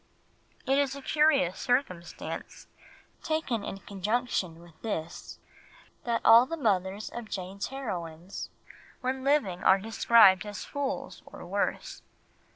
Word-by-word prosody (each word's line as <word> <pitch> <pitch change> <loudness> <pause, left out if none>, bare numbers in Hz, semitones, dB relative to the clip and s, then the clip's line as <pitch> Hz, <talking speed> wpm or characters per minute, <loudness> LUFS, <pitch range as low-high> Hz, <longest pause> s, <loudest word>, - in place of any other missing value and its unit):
It 270 +1 +3
is 280 -1 0
a 280 - -8
curious 295 - +2
circumstance, 245 -9 -3 0.6
taken 315 -9 -1
in - - -5
conjunction 200 -4 -2
with 170 -2 -18
this, 170 -8 -5 0.7
that 235 -1 0
all 230 +3 +8
the 330 - -4
mothers 200 - -1
of 235 -2 -7
Jane's 195 +1 -4
heroines, 180 -9 -6 0.5
when 260 +1 -2
living, 250 -11 +1
are 190 - +6
described 215 -2 +5
as 205 -1 -7
fools 285 -2 -4
or - - -11
worse. - - -2
220 Hz, 120 wpm, -29 LUFS, 185-265 Hz, 0.7 s, all